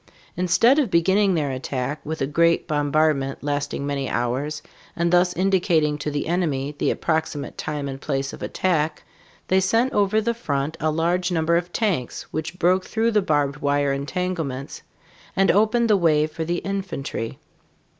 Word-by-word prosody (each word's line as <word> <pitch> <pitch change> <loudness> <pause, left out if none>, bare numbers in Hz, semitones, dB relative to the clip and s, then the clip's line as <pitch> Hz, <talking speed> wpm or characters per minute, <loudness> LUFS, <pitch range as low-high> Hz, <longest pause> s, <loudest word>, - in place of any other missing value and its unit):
Instead 205 - +4
of 270 -7 +1
beginning 190 +3 +3
their 145 -4 0
attack 130 +2 -3
with 155 -1 -3
a - - +2
great 170 +5 +2
bombardment 145 -2 +1
lasting 145 -1 -2
many 140 -2 -2
hours 135 +5 -2 0.3
and 170 +1 0
thus 180 0 +4
indicating 175 -5 +2
to 150 0 -3
the 145 -1 -2
enemy 150 -5 -1
the - - +1
approximate 160 -3 -2
time 150 -2 -4
and 135 0 -6
place 135 -2 -2
of - - -10
attack, 160 -4 -1 0.4
they 190 - +3
sent 225 +7 +2
over 205 +1 +2
the 235 +2 0
front 150 -9 -2
a 155 - +1
large 175 +4 0
number 165 0 +2
of 175 +1 -1
"tanks" 180 - -1
which 160 +3 -4
broke 185 +1 +3
through 230 +3 0
the 210 -2 +3
barbed 145 -5 0
wire 145 -1 +1
entanglements 145 -2 -3 0.5
and 195 0 +4
opened 220 +3 +3
the 215 - +5
way 155 -5 +3
for 155 +1 -5
the 170 +2 -1
infantry. 185 - -4
160 Hz, 165 wpm, -23 LUFS, 145-185 Hz, 0.5 s, the